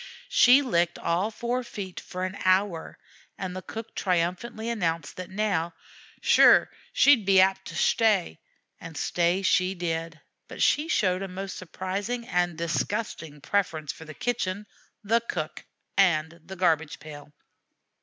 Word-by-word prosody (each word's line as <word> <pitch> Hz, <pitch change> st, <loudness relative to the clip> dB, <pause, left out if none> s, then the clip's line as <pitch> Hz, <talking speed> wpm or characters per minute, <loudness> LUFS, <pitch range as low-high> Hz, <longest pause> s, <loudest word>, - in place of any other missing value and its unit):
She 255 Hz, +4 st, +6 dB
licked 175 Hz, -, +1 dB
all 180 Hz, +5 st, 0 dB
four 240 Hz, +3 st, -2 dB
feet 200 Hz, -6 st, -7 dB
for 185 Hz, 0 st, -5 dB
an 185 Hz, +1 st, -5 dB
hour, 185 Hz, -2 st, +1 dB, 0.4 s
and 185 Hz, -2 st, -5 dB
the 185 Hz, -, -5 dB
cook 225 Hz, +4 st, -8 dB
triumphantly 185 Hz, +5 st, -1 dB
announced 170 Hz, -9 st, -2 dB
that 185 Hz, -1 st, -6 dB
now 190 Hz, -5 st, -1 dB, 0.5 s
"shure -, -, +6 dB, 0.2 s
she'd 275 Hz, -6 st, +5 dB
be 195 Hz, -1 st, +5 dB
apt 190 Hz, +1 st, +3 dB
to -, -, -8 dB
shtay." 205 Hz, -, +2 dB, 0.4 s
And 165 Hz, -2 st, -9 dB
stay 175 Hz, +5 st, +1 dB
she 185 Hz, 0 st, +2 dB
did, 165 Hz, -2 st, -3 dB, 0.3 s
but -, -, -10 dB
she 300 Hz, +2 st, +3 dB
showed 185 Hz, -, +1 dB
a 195 Hz, -, -3 dB
most 190 Hz, +1 st, -6 dB
surprising 195 Hz, +7 st, -4 dB
and 175 Hz, -5 st, 0 dB
disgusting 170 Hz, -2 st, -3 dB
preference 155 Hz, -5 st, -1 dB
for 160 Hz, -, -12 dB
the 155 Hz, -1 st, -10 dB
kitchen, 210 Hz, -4 st, -2 dB, 0.4 s
the 230 Hz, +3 st, +2 dB
cook, 155 Hz, -3 st, -4 dB, 0.3 s
and 170 Hz, -4 st, +2 dB
the 190 Hz, +4 st, -9 dB
garbage 160 Hz, -4 st, +1 dB
pail. 145 Hz, -1 st, -11 dB
185 Hz, 145 wpm, -26 LUFS, 170-205 Hz, 0.5 s, She